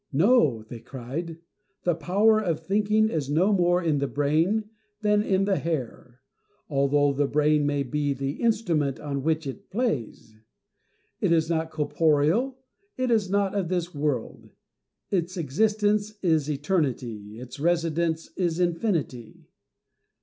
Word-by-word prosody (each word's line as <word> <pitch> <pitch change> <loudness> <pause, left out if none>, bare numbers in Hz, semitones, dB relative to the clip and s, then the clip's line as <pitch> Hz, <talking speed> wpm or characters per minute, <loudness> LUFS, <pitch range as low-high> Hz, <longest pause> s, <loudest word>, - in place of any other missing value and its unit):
" - - -50
No," 150 - +3 0.2
cried 135 +6 -5
they, 165 -1 -9 0.3
" 205 - -48
the 175 - +2
power 200 +7 +3
of 170 -7 -1
thinking 215 +2 +2
is 150 -8 -2
no 180 +8 +3
more 175 -1 +2
in 155 -4 +1
the 140 - 0
brain 160 +11 +1 0.3
than 210 -1 +3
in 195 -2 +1
the 195 -2 +1
hair, 130 -5 -5 0.5
although 140 0 +2
the 140 +1 +1
brain 150 0 +2
may 145 -1 0
be 145 +2 -1
the 135 +2 -4
instrument 175 - +1
on 140 -2 -3
which 160 +2 0
it 135 - -7
plays. 170 - -3 0.9
It - - +1
is 165 0 +2
not 160 -1 0
corporeal, 160 - +1 0.4
it 255 -1 0
is 215 -5 +2
not 200 0 +1
of 195 -4 -1
this 180 -1 -2
world; 145 -5 -3 0.6
its 185 -1 -1
existence 210 +6 +1
is 160 -4 +2
eternity, 130 - -2
its 125 +2 -9
residence 165 0 0
is 175 -2 -1
infinity." 170 - -2
160 Hz, 140 wpm, -26 LUFS, 145-195 Hz, 0.9 s, No